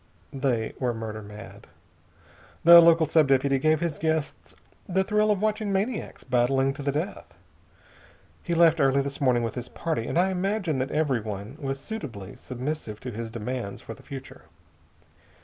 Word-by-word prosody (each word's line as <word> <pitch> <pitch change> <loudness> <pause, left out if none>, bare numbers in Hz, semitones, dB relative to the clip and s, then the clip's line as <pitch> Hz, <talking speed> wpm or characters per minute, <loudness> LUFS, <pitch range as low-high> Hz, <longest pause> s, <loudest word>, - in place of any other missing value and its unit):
They 125 -5 -1
were 125 -3 0
murder 110 -1 -5
mad. 105 0 -11 1.0
The 170 +1 +10
local 165 -1 +5
sub 155 -1 +3
deputy 135 0 +2
gave 155 +2 +2
his 165 -4 -2
guests 160 -2 -2 0.3
the 190 +1 +2
thrill 210 +1 +2
of 205 -1 +1
watching 215 -1 0
maniacs 205 +5 -2
battling 135 +2 +2
to 140 - -8
the 140 0 0
death. 155 +7 -5 1.1
He 170 - -2
left 165 -1 +5
early 135 -1 +3
this 140 +1 -5
morning 125 -3 +3
with 115 -2 -2
his 125 0 -6
party, 155 -9 -3
and - - -2
I 185 +2 +3
imagine 185 -5 -1
that 130 +1 -1
everyone 115 -7 -2
was 135 -2 -3
suitably 130 - -7
submissive 125 -3 -5
to 125 - -5
his 115 +1 -5
demands 115 -2 -5
for 115 - -8
the - - -16
future. 135 - -10
140 Hz, 165 wpm, -26 LUFS, 120-165 Hz, 1.1 s, The